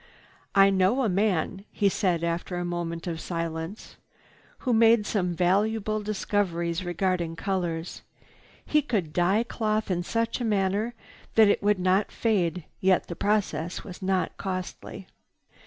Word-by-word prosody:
"I 195 Hz, 0 st, +7 dB
know 195 Hz, +8 st, +2 dB
a 225 Hz, -, +2 dB
man," 195 Hz, -1 st, 0 dB
he 205 Hz, -, +1 dB
said 180 Hz, -4 st, +1 dB
after 170 Hz, +2 st, -2 dB
a 175 Hz, -, -2 dB
moment 170 Hz, -1 st, -3 dB
of 165 Hz, -3 st, -4 dB
silence, 165 Hz, +3 st, -5 dB, 0.7 s
"who 250 Hz, -, +2 dB
made 225 Hz, -1 st, +5 dB
some 180 Hz, -5 st, -1 dB
valuable 210 Hz, +4 st, +1 dB
discoveries 185 Hz, -5 st, -1 dB
regarding 175 Hz, -1 st, -1 dB
colors. 175 Hz, -2 st, -3 dB, 0.6 s
He 300 Hz, -, +3 dB
could 205 Hz, -, -2 dB
dye 185 Hz, +6 st, +3 dB
cloth 215 Hz, -3 st, -1 dB
in 175 Hz, -1 st, 0 dB
such 230 Hz, +6 st, -1 dB
a -, -, 0 dB
manner 210 Hz, +2 st, 0 dB, 0.4 s
that 220 Hz, -2 st, +7 dB
it -, -, +2 dB
would 205 Hz, 0 st, +3 dB
not 185 Hz, +2 st, +1 dB
fade, 180 Hz, -7 st, 0 dB, 0.2 s
yet 185 Hz, -1 st, +2 dB
the 170 Hz, -, -4 dB
process 200 Hz, -4 st, -1 dB
was 185 Hz, -2 st, -10 dB
not 190 Hz, -1 st, 0 dB
costly. 185 Hz, -2 st, -5 dB
190 Hz, 140 wpm, -27 LUFS, 175-210 Hz, 0.7 s, I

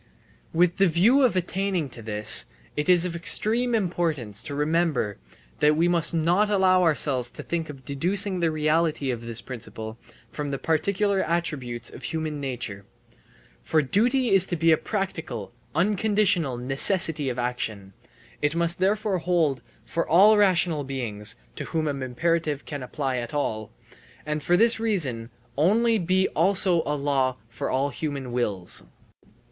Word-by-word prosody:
With 175 Hz, +1 st, +2 dB
the 195 Hz, 0 st, +4 dB
view 200 Hz, -, +4 dB
of 250 Hz, -7 st, +3 dB
attaining 185 Hz, -2 st, -1 dB
to 120 Hz, -, -10 dB
this, 105 Hz, -1 st, +2 dB, 0.3 s
it 150 Hz, +4 st, -2 dB
is 180 Hz, -1 st, +5 dB
of 175 Hz, -2 st, -3 dB
extreme 230 Hz, +8 st, +1 dB
importance 165 Hz, -, -1 dB
to 145 Hz, -, -5 dB
remember 150 Hz, -7 st, 0 dB, 0.4 s
that 150 Hz, +1 st, +4 dB
we 165 Hz, +3 st, +2 dB
must 170 Hz, -2 st, +1 dB
not 175 Hz, +6 st, +2 dB
allow 190 Hz, -2 st, +3 dB
ourselves 145 Hz, -7 st, +2 dB
to -, -, -9 dB
think 165 Hz, -2 st, -3 dB
of 135 Hz, -3 st, -10 dB
deducing 185 Hz, +7 st, 0 dB
the 170 Hz, -1 st, +2 dB
reality 155 Hz, -2 st, 0 dB
of 120 Hz, -2 st, -5 dB
this 115 Hz, -1 st, -4 dB
principle 110 Hz, -2 st, -7 dB, 0.3 s
from 145 Hz, -1 st, -4 dB
the 140 Hz, -, -2 dB
particular 195 Hz, +6 st, 0 dB
attributes 135 Hz, -9 st, -2 dB
of -, -, -11 dB
human 155 Hz, -2 st, -3 dB
nature. 120 Hz, -7 st, -5 dB, 0.8 s
For 155 Hz, -1 st, +1 dB
duty 240 Hz, -, +1 dB
is 195 Hz, -1 st, +6 dB
to 175 Hz, -, -2 dB
be 165 Hz, 0 st, +3 dB
a -, -, +7 dB
practical, 160 Hz, -, -4 dB, 0.2 s
unconditional 200 Hz, -, +1 dB
necessity 145 Hz, +3 st, +3 dB
of 125 Hz, -, -4 dB
action; 110 Hz, -5 st, -4 dB, 0.5 s
it 145 Hz, +2 st, 0 dB
must 170 Hz, +1 st, 0 dB
therefore 200 Hz, 0 st, +1 dB
hold 165 Hz, -7 st, 0 dB, 0.2 s
for 170 Hz, -, -2 dB
all 200 Hz, +6 st, +6 dB
rational 180 Hz, -6 st, +2 dB
beings 110 Hz, -6 st, -2 dB, 0.2 s
(to -, -, -4 dB
whom 160 Hz, -1 st, -2 dB
an 140 Hz, -2 st, -3 dB
imperative 150 Hz, +3 st, -1 dB
can 145 Hz, -2 st, -6 dB
apply 130 Hz, 0 st, -3 dB
at 120 Hz, +3 st, -5 dB
all), 110 Hz, -7 st, -2 dB, 0.6 s
and 150 Hz, 0 st, -2 dB
for 175 Hz, +4 st, +2 dB
this 230 Hz, +2 st, +5 dB
reason 145 Hz, -, -1 dB, 0.3 s
only 220 Hz, +8 st, +3 dB
be 185 Hz, +2 st, +1 dB
also 185 Hz, 0 st, +3 dB
a 150 Hz, -, 0 dB
law 135 Hz, -3 st, 0 dB
for 115 Hz, -, -4 dB
all 135 Hz, +2 st, 0 dB
human 140 Hz, -2 st, -5 dB
wills. 105 Hz, -, -2 dB
160 Hz, 155 wpm, -25 LUFS, 130-185 Hz, 0.8 s, a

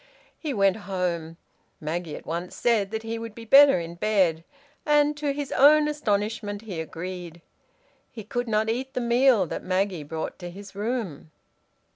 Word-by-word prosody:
He 310 Hz, -, -3 dB
went 195 Hz, -4 st, +2 dB
home. 170 Hz, -4 st, -2 dB, 0.4 s
Maggie 160 Hz, +1 st, -4 dB
at -, -, -10 dB
once 170 Hz, +2 st, -4 dB
said 220 Hz, -5 st, +1 dB
that 220 Hz, +1 st, -4 dB
he 225 Hz, 0 st, -4 dB
would 225 Hz, -2 st, -7 dB
be 230 Hz, -, -9 dB
better 275 Hz, -1 st, +7 dB
in 170 Hz, 0 st, -6 dB
bed, 175 Hz, -4 st, +1 dB, 0.4 s
and 295 Hz, 0 st, +3 dB
to 295 Hz, -1 st, -1 dB
his 280 Hz, 0 st, -4 dB
own 300 Hz, +2 st, +6 dB
astonishment 210 Hz, -6 st, -2 dB
he 185 Hz, -7 st, -5 dB
agreed. 170 Hz, +1 st, -7 dB, 0.7 s
He 220 Hz, -, -8 dB
could 245 Hz, +4 st, -3 dB
not 215 Hz, 0 st, +1 dB
eat 260 Hz, +4 st, -3 dB
the -, -, +1 dB
meal 240 Hz, -3 st, +4 dB
that -, -, -5 dB
Maggie 185 Hz, -2 st, 0 dB
brought 160 Hz, +2 st, -5 dB
to 175 Hz, -1 st, -6 dB
his 195 Hz, +2 st, -11 dB
room. 205 Hz, -, -4 dB
205 Hz, 165 wpm, -25 LUFS, 175-245 Hz, 0.7 s, better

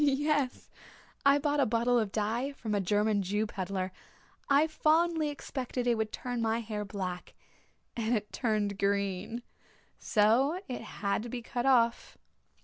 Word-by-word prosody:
"Yes. 290 Hz, -1 st, +1 dB, 0.6 s
I 280 Hz, +1 st, +7 dB
bought 290 Hz, 0 st, 0 dB
a 275 Hz, -, +4 dB
bottle 235 Hz, +2 st, +2 dB
of 215 Hz, -3 st, -1 dB
dye 230 Hz, +7 st, -1 dB
from 220 Hz, -5 st, -4 dB
a 205 Hz, -, +2 dB
German 205 Hz, +2 st, +2 dB
Jew 205 Hz, +3 st, 0 dB
pedlar. 190 Hz, -2 st, -3 dB, 0.6 s
I 285 Hz, +2 st, +5 dB
fondly 315 Hz, 0 st, +2 dB
expected 260 Hz, -3 st, -4 dB
it 240 Hz, -, +4 dB
would 220 Hz, -1 st, -1 dB
turn 245 Hz, -1 st, -3 dB
my 225 Hz, 0 st, +1 dB
hair 215 Hz, -2 st, -4 dB
black 185 Hz, -3 st, -5 dB, 0.6 s
and 230 Hz, +1 st, 0 dB
it 210 Hz, 0 st, -7 dB
turned 215 Hz, -4 st, 0 dB
it 200 Hz, -, -10 dB
green. 200 Hz, +3 st, -1 dB, 0.6 s
So 245 Hz, -, +3 dB
it 255 Hz, -, -4 dB
had 205 Hz, -2 st, -2 dB
to 240 Hz, -, -7 dB
be 240 Hz, 0 st, -5 dB
cut 245 Hz, +2 st, -2 dB
off." 235 Hz, -3 st, +2 dB
230 Hz, 155 wpm, -30 LUFS, 205-270 Hz, 0.6 s, I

